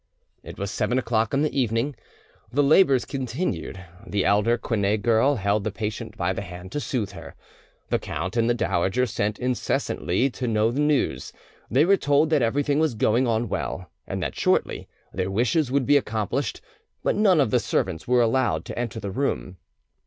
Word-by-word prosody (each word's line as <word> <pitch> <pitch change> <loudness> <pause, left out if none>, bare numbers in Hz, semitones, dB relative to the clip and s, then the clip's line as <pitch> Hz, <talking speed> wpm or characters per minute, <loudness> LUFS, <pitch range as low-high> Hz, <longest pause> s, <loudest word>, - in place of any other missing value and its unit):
It - - -10
was 100 0 -3
seven 110 +4 0
o'clock 115 -2 0
in 140 +1 +1
the 155 - -1
evening; 125 +2 0 0.6
the 145 +4 +2
labours 140 -3 +5
continued; 125 - -4 0.2
the 100 -1 -1
elder 105 +4 +3
Quinet 105 -2 -1
girl 120 +5 +3
held 100 -1 0
the 110 - -1
patient 105 +1 -5
by - - 0
the - - -4
hand 90 +1 -9
to - - -2
soothe 115 -8 -2
her. 100 - -11 0.6
The - - +2
count 95 +5 -4
and 115 0 +2
the 120 - +2
dowager 95 +2 +1
sent 105 -3 -2
incessantly 125 -2 -1
to 125 0 -4
know 110 0 +2
the 130 - -3
news. 140 - 0 0.4
They 135 +7 +4
were 195 +2 +4
told 145 0 +2
that 150 -3 +3
everything 140 +5 +1
was 155 -6 +1
going 115 +4 +2
on 115 0 0
well, 65 +9 -4 0.2
and - - -3
that - - -3
shortly - - 0 0.3
their 95 0 -2
wishes 125 +7 +1
would 140 -1 +1
be 145 +2 +5
accomplished; 110 -6 -2 0.4
but - - +1
none 200 -5 +4
of 130 -7 +2
the - - +4
servants 80 - -2
were 125 0 +4
allowed 115 -9 +1
to - - -6
enter 115 -3 -3
the 100 -2 -5
room. 95 -6 -2
115 Hz, 185 wpm, -24 LUFS, 100-135 Hz, 0.6 s, labours